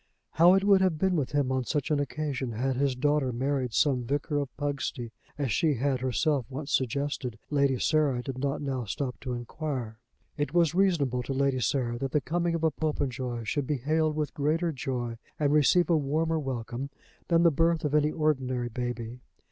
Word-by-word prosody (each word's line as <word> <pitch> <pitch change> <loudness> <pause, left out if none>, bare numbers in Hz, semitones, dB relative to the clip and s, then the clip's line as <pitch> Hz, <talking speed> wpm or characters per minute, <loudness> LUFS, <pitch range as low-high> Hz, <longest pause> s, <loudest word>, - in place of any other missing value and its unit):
How 175 +3 +6
it 195 - +2
would 200 -1 +5
have 185 -4 +2
been 185 +3 +1
with 145 -6 -1
him 140 -3 +1
on 130 -1 0
such 145 +3 -2
an 150 - +2
occasion 140 -3 -3
had 130 +4 -1
his 135 0 +1
daughter 145 0 +1
married 130 +1 -1
some 130 +1 +2
vicar 145 +4 -1
of 140 -2 -3
Pugsty, 140 -4 -3 0.3
as 140 -5 -1
she 155 0 +2
had 130 +1 0
herself 130 +1 0
once 140 +2 -5
suggested, 130 -2 -1
Lady 140 -2 +2
Sarah 145 -4 +1
did 130 -1 -5
not 140 +2 -2
now 135 -3 -2
stop 125 +5 -4
to 125 -2 -4
enquire. 120 -2 -4 0.4
It 145 +2 -2
was 170 -2 +4
reasonable 165 -10 +2
to 135 - -4
Lady 135 -1 +1
Sarah 120 0 0
that 135 0 -3
the 150 - +4
coming 170 +3 -1
of 165 - -3
a 160 - +3
Popenjoy 130 -6 -2
should 135 +5 -2
be 150 - 0
hailed 155 +4 +1
with 150 -2 -2
greater 160 +4 0
joy 125 -4 -4 0.2
and 145 -1 +2
receive 150 +4 +4
a 170 - +3
warmer 160 +3 0
welcome 130 -1 -4 0.4
than 170 -1 +4
the 170 - +6
birth 165 +2 +1
of 145 - -1
any 150 0 +3
ordinary 130 -6 0
baby. 120 0 -4
140 Hz, 195 wpm, -28 LUFS, 125-155 Hz, 0.4 s, How